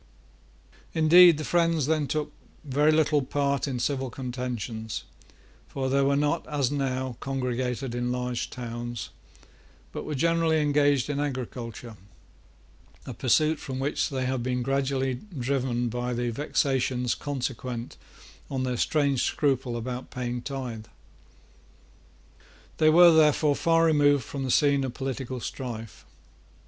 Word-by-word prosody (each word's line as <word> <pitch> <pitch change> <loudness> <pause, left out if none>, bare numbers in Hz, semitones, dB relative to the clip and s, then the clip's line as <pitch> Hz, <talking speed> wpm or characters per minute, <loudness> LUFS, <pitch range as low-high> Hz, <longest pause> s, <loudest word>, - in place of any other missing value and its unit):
Indeed, 165 +1 +7
the 155 - -4
friends 165 -3 +2
then 155 -1 +1
took 155 +1 -2 0.3
very 145 +2 +2
little 155 -1 +3
part 140 +1 -1
in 130 -3 -2
civil 130 +1 -1
contentions; 120 -4 -5 0.6
for 130 -1 -3
they 140 +1 +3
were 140 +1 +2
not, 150 +3 0
as 145 -4 0
now, 130 -3 -2
congregated 125 -1 -2
in 120 0 -1
large 125 -1 -2
towns, 120 -2 -6 0.8
but - - -5
were 150 - -4
generally 165 +2 +2
engaged 145 -2 +2
in 145 -1 -2
agriculture, 125 -5 -5 1.1
a - - -6
pursuit 155 +4 +2
from 130 -1 -6
which 135 +3 -1
they 130 -3 -2
have 130 -1 -1
been 125 0 -1
gradually 135 -1 0 0.2
driven 125 -1 -1
by 120 +1 -3
the 120 0 -1
vexations 130 -2 0
consequent 125 -4 -4 0.5
on 130 -1 -2
their 125 -1 -1
strange 140 -1 +1
scruple 135 -4 0
about 125 +2 -5
paying 125 -1 -4
tithe. 125 -5 -6 1.9
They 155 - +5
were, 170 +2 +8
therefore, 150 -2 +4
far 165 +1 +3
removed 145 -4 +4
from 135 +5 -5
the - - -3
scene 140 +1 +3
of 130 -2 -4
political 130 -1 -4
strife. 115 -3 -7
135 Hz, 130 wpm, -27 LUFS, 125-145 Hz, 1.9 s, were